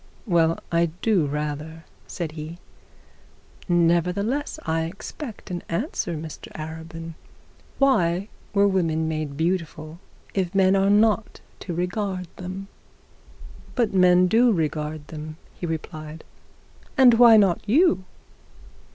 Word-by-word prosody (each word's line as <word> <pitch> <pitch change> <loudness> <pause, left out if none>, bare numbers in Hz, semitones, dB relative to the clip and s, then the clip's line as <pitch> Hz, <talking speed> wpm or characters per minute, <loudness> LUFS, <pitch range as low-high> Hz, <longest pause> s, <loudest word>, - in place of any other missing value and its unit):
'Well, 165 -5 +3
I 170 0 +3 0.2
do 195 -9 +3
rather,' 150 +2 -4 0.2
said 170 -4 -4
he. 155 +2 -7 1.1
'Nevertheless 180 - +1
I 160 0 0
expect 210 - -8
an 175 -1 -3
answer, 175 - -2
Mr 155 0 -8
Arabin. 165 +1 -7 0.6
Why 190 -9 +2 0.2
were 200 0 +4
women 165 -5 +1
made 155 -3 -3
beautiful 165 -1 -2 0.3
if 190 -1 -1
men 190 0 +4
are 195 0 +3
not 215 +1 +2 0.2
to 175 - -5
regard 180 +1 -2
them?' 185 +2 -6 1.1
'But 235 -5 +1
men 180 -1 +5
do 230 +6 +4
regard 155 -4 -2
them,' 155 0 -7 0.2
he 175 - -5
replied. 155 -1 -6 0.7
'And 255 -3 +8
why 230 -1 +8
not 195 -5 +3
you?' 310 - +4
175 Hz, 115 wpm, -24 LUFS, 160-200 Hz, 1.1 s, And